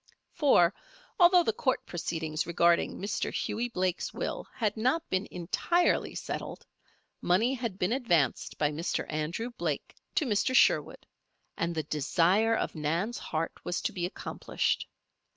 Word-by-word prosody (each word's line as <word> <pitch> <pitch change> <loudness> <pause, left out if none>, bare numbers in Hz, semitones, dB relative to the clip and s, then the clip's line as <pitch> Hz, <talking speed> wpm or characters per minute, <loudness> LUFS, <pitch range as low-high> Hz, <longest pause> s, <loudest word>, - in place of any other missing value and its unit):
For, 230 - +4 0.5
although 355 0 +7
the 225 - +1
court 260 +4 0
proceedings 160 -2 -3
regarding 170 0 +2
Mr. 200 +1 -2
Hughie 235 +3 -2
Blake's 185 -4 -1
will - - -4
had 215 -4 0
not 255 +9 0
been 185 +2 0
entirely 340 - +1
settled, - - -5 0.6
money 220 +9 +2
had 235 -7 -4
been 190 +4 +1
advanced 175 - +1
by 150 -1 +1
Mr. 160 +4 -2
Andrew 165 +10 -3
Blake 240 - -3 0.2
to 310 - +2
Mr. 255 +3 +1
Sherwood - - +3 0.5
and 170 0 -2
the 155 - -1
desire 175 +10 +2
of - - -2
Nan's 165 +9 -1
heart 160 +1 -2
was 175 - -2
to - - -1
be 175 -1 -1
accomplished. 185 - -2
185 Hz, 140 wpm, -29 LUFS, 170-240 Hz, 0.6 s, although